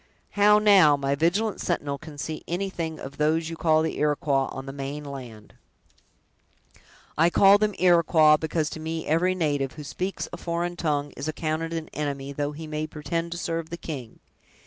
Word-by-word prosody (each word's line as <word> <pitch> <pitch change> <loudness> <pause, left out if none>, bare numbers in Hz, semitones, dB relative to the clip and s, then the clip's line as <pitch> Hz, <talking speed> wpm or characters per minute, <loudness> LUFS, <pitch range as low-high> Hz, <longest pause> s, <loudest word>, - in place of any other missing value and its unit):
How, 210 +1 +5
now, 195 -9 +6
my 140 0 -1
vigilant 180 +9 0
sentinel, 145 -5 -2
can 150 0 -11
see 155 +2 -5
anything 175 -3 -3
of 135 +1 -9
those 155 +2 +1
you 165 - -5
call 160 -1 +3
the 160 - -3
Iroquois, 145 -2 +1
on 135 - -7
the 135 - -7
main 140 +2 -5
land!" 125 -7 -9 1.7
"I 165 +2 +5
call 195 +3 +6
them 210 -2 0
Iroquois, 170 -3 +5
because 155 0 -2
to - - -6
me 160 +1 -4
every 180 +4 +2
native, 145 -6 -1
who 150 - -9
speaks 185 +7 -4
a - - -4
foreign 170 +1 -3
tongue, 145 -4 -1
is 140 - -5
accounted 155 +1 -2
an 165 -1 -4
enemy, 140 -2 -4
though 145 +1 -2
he 160 +2 -8
may 155 0 -3
pretend 165 +2 -4
to - - -6
serve 165 -1 -3
the 170 - -5
king! 135 -9 -7
155 Hz, 180 wpm, -25 LUFS, 145-170 Hz, 1.7 s, now